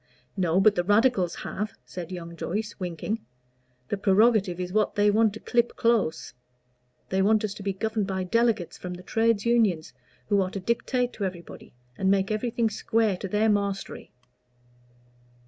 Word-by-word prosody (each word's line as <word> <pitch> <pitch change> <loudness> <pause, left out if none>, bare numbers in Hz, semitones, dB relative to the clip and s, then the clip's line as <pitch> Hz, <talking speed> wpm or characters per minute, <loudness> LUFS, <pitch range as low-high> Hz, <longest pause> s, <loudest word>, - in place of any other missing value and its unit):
"No, 180 -1 +2
but 205 +2 +5
the 175 - 0
Radicals 205 -2 +2
have," 210 +2 -4
said 180 -2 -7
young 170 -2 -7
Joyce, 210 +6 -3
winking. 185 +5 -4 0.7
"The 205 - -1
prerogative 195 -2 +3
is 180 0 -4
what 215 0 +1
they 205 0 +4
want 220 +1 +3
to 220 - -8
clip 240 -1 0
close. 230 -8 0 0.8
They 190 0 +1
want 215 +2 +3
us 210 -2 -2
to 205 - -10
be 200 0 -1
governed 215 +1 -2
by 190 -1 -2
delegates 225 -2 0
from 180 0 -6
the 180 - -11
trades 225 +2 +1
unions, 215 - +2 0.3
who 205 -2 +3
are 185 - -1
to 195 - -5
dictate 245 +4 -1
to 210 - -5
everybody, 175 -8 -8 0.2
and 190 - +2
make 195 +1 +2
everything 225 +1 0
square 220 -1 +1
to 195 - -5
their 210 +3 +1
mastery." 200 -2 -2
205 Hz, 165 wpm, -26 LUFS, 185-220 Hz, 0.8 s, but